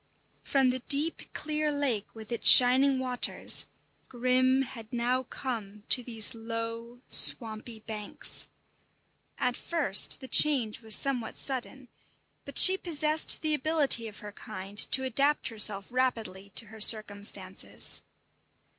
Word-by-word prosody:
From 265 -2 0
the 255 - -5
deep, 290 +5 0
clear 305 0 -4
lake 270 -8 -3
with 220 +1 -12
its 235 - +3
shining 260 +2 +6
waters, 255 -1 +1 0.4
Grim 255 +1 0
had 230 -3 -12
now 245 +1 -2
come 220 -6 -8
to 250 - +1
these 225 -3 +1
low, 230 +1 -8
swampy 220 0 +2
banks. 215 -2 -4 0.9
At 250 0 -2
first 300 - +1
the 260 - -11
change 260 -7 +1
was 220 -2 +3
somewhat 250 -5 -1
sudden; 265 0 -3 0.6
but - - -10
she 380 +1 +6
possessed 310 -2 +1
the 310 -1 -1
ability 295 -5 +1
of 210 - -12
her 205 - -9
kind 200 0 -9
to 265 - +3
adapt 275 +4 -1
herself 210 -3 +3
rapidly 225 -6 -4
to - - +1
her 220 - -13
circumstances. 205 -3 0
245 Hz, 130 wpm, -27 LUFS, 220-270 Hz, 0.9 s, shining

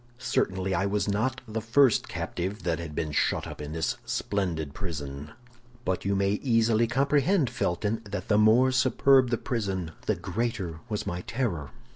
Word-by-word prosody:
"Certainly 95 -6 0
I 95 +2 +1
was 100 0 0
not 120 +6 0
the 110 +1 -3
first 120 +2 +4
captive 95 +5 -4
that 85 -2 0
had 80 -3 -6
been 75 -2 -2
shut - - +1
up - - -8
in 75 0 -6
this 80 +1 -1
splendid 85 -8 -2
prison; 75 -5 -6 0.5
but 95 0 -1
you 100 0 +1
may 100 +1 +1
easily 115 -2 +3
comprehend, 140 - +2
Felton, 105 +1 -1
that 100 0 -5
the 105 -1 +4
more 115 +5 +5
superb 130 0 +4
the 120 - +1
prison, 95 -10 -2 0.2
the - - +2
greater 95 -5 -3
was 105 -2 -2
my 90 -2 -3
terror. 95 - -2
105 Hz, 165 wpm, -27 LUFS, 90-120 Hz, 0.5 s, more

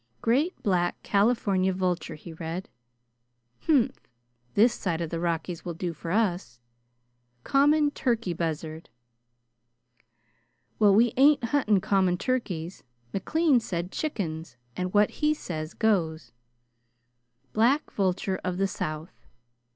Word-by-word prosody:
"'Great 280 +10 +1
black 175 -3 +1
California 200 -3 +2
vulture,'" 180 -3 -2
he 165 +2 -10
read. 165 +3 -5 1.0
"Humph! 285 -8 +3 0.6
This 230 +4 +5
side 170 -4 -2
the 165 - -2
Rockies 170 0 -2
will 170 -2 -5
do 175 0 -3
for 165 +2 -8
us." 180 - 0 0.8
"'Common 290 +2 +3
turkey 235 -9 -1
buzzard.'" 160 -1 -4 1.9
"Well, 205 -2 +6
we 235 +2 +4
ain't 280 0 +5
hunting 225 -6 +2
common 190 -2 +2
turkeys. 185 -8 -3 0.3
McLean 305 - +2
said 180 -4 -4
chickens, 165 - -4 0.2
and 180 0 -2
what 210 +1 +4
he 305 0 +3
says 155 - -6
goes." 165 - 0 1.2
"'Black 250 +7 +2
vulture 190 -1 -1
of 180 -1 -2
the 195 +1 +2
South.'" 155 -2 -6
190 Hz, 110 wpm, -27 LUFS, 170-235 Hz, 1.9 s, Well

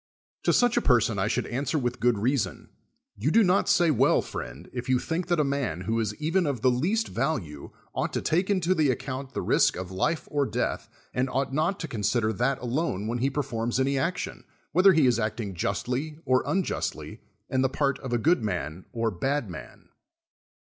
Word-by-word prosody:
To - - +4
such 245 -1 +3
a - - +4
person 115 -5 +3
I 95 - +1
should - - 0
answer 140 +5 -1
with 125 -3 -2
good 120 -2 +3
reason: 125 +4 -1 0.5
You 115 +9 0
do 225 +7 +5
not 185 0 +2
say 170 -3 +4
well, 130 - +3
friend, - - -7
if 125 0 -5
you 130 - +4
think 165 +6 -2
that 175 -2 +1
a - - +4
man, 140 - -1
who 110 +5 -1
is 105 -2 -1
even 165 - 0
of 135 -6 -2
the 130 - +4
least 190 - 0
value, 80 - -3 0.2
ought - - -1
to - - -1
take 180 +5 +1
into 185 -3 +2
the 155 -5 +2
account 130 +1 -4
the - - -2
risk - - +3
of 95 0 -6
life 125 - -1
or 145 -2 +1
death, - - -2 0.2
and 130 +1 0
ought 135 +1 -1
not 160 +7 0
to 165 - -3
consider 110 -2 0
that 125 +6 +1
alone 125 - -1
Avhen 120 +2 -2
he 135 +3 +2
performs 120 -4 -2
any 135 +1 +1
action, 170 +7 -2 0.3
whether 185 +3 +6
he 155 -4 +4
is 120 -2 +3
acting 110 -2 -2
justly 125 - -2
or 130 0 +3
unjustly 110 - -2 0.3
and 130 0 +1
the 130 - +2
part 140 0 0
of 130 - -6
a 120 - +2
good 160 +6 +3
man 90 -4 -3
or 115 -2 -1
bad 130 +3 -1
man. 85 - -11
130 Hz, 200 wpm, -27 LUFS, 115-155 Hz, 0.5 s, whether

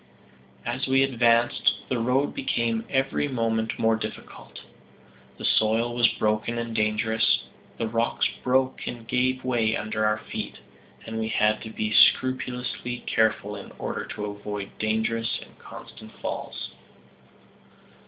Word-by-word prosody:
As 125 +3 -2
we 135 +1 +4
advanced, 120 -2 +3
the 125 - 0
road 125 +5 +1
became 115 - 0
every 135 +2 +1
moment 115 -4 0
more 115 0 +3
difficult. 110 - -8 0.8
The - - -5
soil 115 +2 +2
was 120 -1 +5
broken 110 +2 0
and 115 -1 -3
dangerous. 110 +1 +2 0.3
The 115 - -1
rocks 115 +1 +1 0.2
broke 130 +1 +1
and 115 -2 -6
gave 130 +1 +1
way 115 -3 +1
under 110 +1 -2
our 105 0 +3
feet, 110 - -6 0.5
and 110 0 -4
we 110 - -1
had 105 -1 +2
to 110 - -7
be 110 0 -2
scrupulously 125 -1 +2
careful 105 -2 +1
in 100 - -9
order - - -3
to 105 - -5
avoid 100 -1 -5
dangerous 110 +1 0
and - - -15
constant 110 0 -11
falls. - - -5
115 Hz, 135 wpm, -26 LUFS, 110-125 Hz, 0.8 s, was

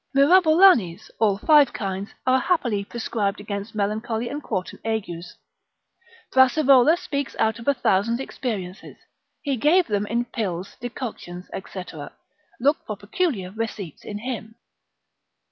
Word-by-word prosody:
Mirabolanes, 315 - +5
all 210 -3 +3
five 295 +5 +5
kinds, 195 -2 -4 0.2
are 260 0 +4
happily 245 - 0
prescribed 205 -2 -2
against 205 +1 -6
melancholy 220 +3 -2
and 290 +1 -5
quartan 190 -9 -4
agues; 190 -6 -4 1.0
Brassivola 265 +3 +5
speaks 280 -4 -4
out 220 +1 +1
of 230 - -11
a 280 - +4
thousand 230 0 +1
experiences, 210 -9 -5 0.5
he 280 -4 -1
gave 330 +9 +4
them 205 -1 -1
in 235 +3 0
pills, 195 -6 -4
decoctions, 220 -7 -7 0.2
&c., 185 - -5 0.8
look 285 +5 +3
for 215 - -4
peculiar 205 - -2
receipts 215 -6 -5
in 205 - -6
him. 225 -1 -6
225 Hz, 125 wpm, -23 LUFS, 200-270 Hz, 1.0 s, Mirabolanes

